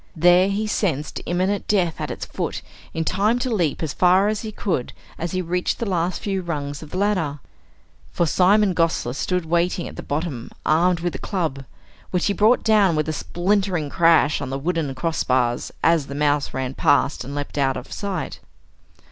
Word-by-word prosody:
There 175 +3 +5
he 205 +2 -1
sensed 165 -9 -1
imminent 185 +3 0
death 175 -7 +1
at - - -3
its - - -5
foot - - -4 0.3
in 160 0 -2
time 210 +7 +2
to 245 -1 -1
leap 170 -7 0
as 155 - -2
far 185 +3 +4
as 215 -1 -2
he 220 - -5
could 180 -12 -2 0.3
as 170 +3 -3
he 185 0 -1
reached 180 +1 -1
the 235 - -3
last 180 -1 -1
few 195 -2 -1
rungs 145 -4 -4
of 155 - -10
the 180 - -5
ladder. 185 -8 0 0.7
For 170 - +1
Simon 190 +5 +4
Gosler 165 -7 0
stood 180 +5 -1
waiting 170 +2 0
at - - -10
the - - -4
bottom 145 -5 -4 0.2
armed 170 +2 +3
with 175 0 -1
a - - -6
club, 160 -9 -3 0.4
which 180 -1 0
he 205 - +2
brought 220 +5 +3
down 210 -6 +4
with 155 0 0
a - - -1
splintering 175 -2 -1
crash 165 -3 +4
on 135 - -4
the 135 - -2
wooden 155 -2 -2
crossbars 130 -5 0
as 165 -4 +3
the 140 - -6
mouse 145 0 +1
ran 130 -1 -3
past 145 -2 +2
and 140 +3 -7
leapt 145 0 -4
out 135 -1 +1
of - - -9
sight. 200 -2 -4
170 Hz, 190 wpm, -22 LUFS, 145-190 Hz, 0.7 s, There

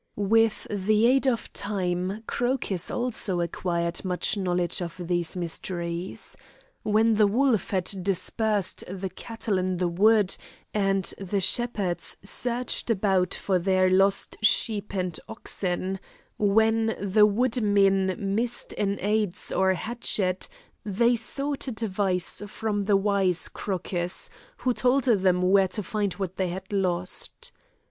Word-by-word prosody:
With 220 +2 +2
the 210 +2 +2
aid 265 +2 +3
of 235 -3 -1
time, 190 0 -2
Crocus 245 -9 -1
also 220 -7 0
acquired 170 0 -2
much 180 +2 0
knowledge 180 -3 -1
of 170 0 -6
these 175 +1 -1
mysteries. 170 0 -4 0.5
When 220 +2 +3
the 210 -1 +4
wolf 235 -1 +1
had 190 0 -1
dispersed 200 +2 0
the 190 0 -4
cattle 225 -4 -3
in 185 0 -1
the 180 0 0
wood, 205 +3 +3 0.4
and 195 -2 +1 0.2
the 195 +1 -2
shepherds 200 -2 +1
searched 245 +4 -2
about 190 -4 +1
for 190 -2 0
their 185 +1 +2
lost 195 +3 +3
sheep 210 -1 +2
and 180 -3 -2
oxen; 190 -4 -2 0.4
when 220 +2 +2
the 205 +2 +4
woodmen 205 -4 +2
missed 220 +5 -2
an 200 -1 0
adze 210 -2 0
or 190 0 +2
a 190 - +2
hatchet, 195 -3 -1 0.4
they 235 +4 +2
sought 275 +5 -1
advice 200 -7 0
from 205 -1 -2
the 200 -1 +4
wise 195 -3 +2
Crocus, 180 -2 -2 0.3
who 255 - 0
told 255 +3 +2
them 185 -6 +2
where 190 +1 +4
to 200 +3 -3
find 205 -2 -2
what 185 -1 -5
they 190 - 0
had 190 +3 -7
lost. 180 -2 -1
195 Hz, 130 wpm, -26 LUFS, 185-220 Hz, 0.5 s, the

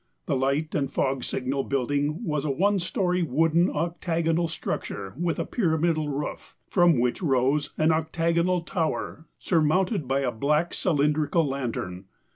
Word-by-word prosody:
The - - 0
light 140 +4 0
and 140 -2 -1
fog 135 -2 0
signal 135 +2 -2
building 145 - -1
was 150 -7 -1
a 155 - -1
one 195 +8 +2
story, 180 0 0
wooden, 165 +4 +2
octagonal 165 +1 0
structure 95 - -4
with 170 +1 -1
a - - -1
pyramidal 160 -6 0
roof, 145 +1 -5
from 175 -5 +4
which 125 +6 0
rose 140 -1 +1
an 155 +1 +3
octagon 170 +2 +1
tower 160 -1 -3
surmounted 170 - +1
by 135 +1 +1
a 130 -3 0
black 150 +8 0
cylindrical 150 0 +1
lantern. 115 -9 -4
155 Hz, 140 wpm, -26 LUFS, 140-170 Hz, -, from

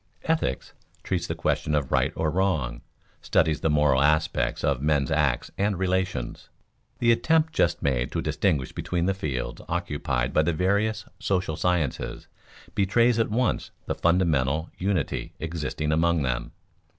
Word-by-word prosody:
Ethics 160 0 -1 0.3
treats - - -1
the - - -3
question 75 - 0
of 70 -3 -1
right - - +2
or 80 -1 0
wrong, 80 -10 0 0.4
studies 80 -1 +2
the 80 - +1
moral 75 -3 +3
aspects 70 -5 +1
of 70 -3 +1
men's 75 -3 +1
acts - - +1
and 100 -1 +1
relations. 95 -9 -2 0.5
The 115 -1 +3
attempt 160 +7 +2
just 85 - +1
made 65 -3 0
to - - 0
distinguish 65 -4 0
between 85 -1 -2
the 95 - +2
fields 70 -10 -4
occupied - - -1
by - - +4
the 85 +2 +1
various 100 +6 0
social 90 -5 0
sciences 85 -5 -1 0.5
betrays 115 +4 +3
at 115 - +2
once 120 +3 0 0.2
the - - -1
fundamental 80 -3 +1
unity 95 -5 -1
existing 80 -2 -3
among 80 0 +2
them. 65 -1 -2
80 Hz, 145 wpm, -26 LUFS, 70-95 Hz, 0.5 s, by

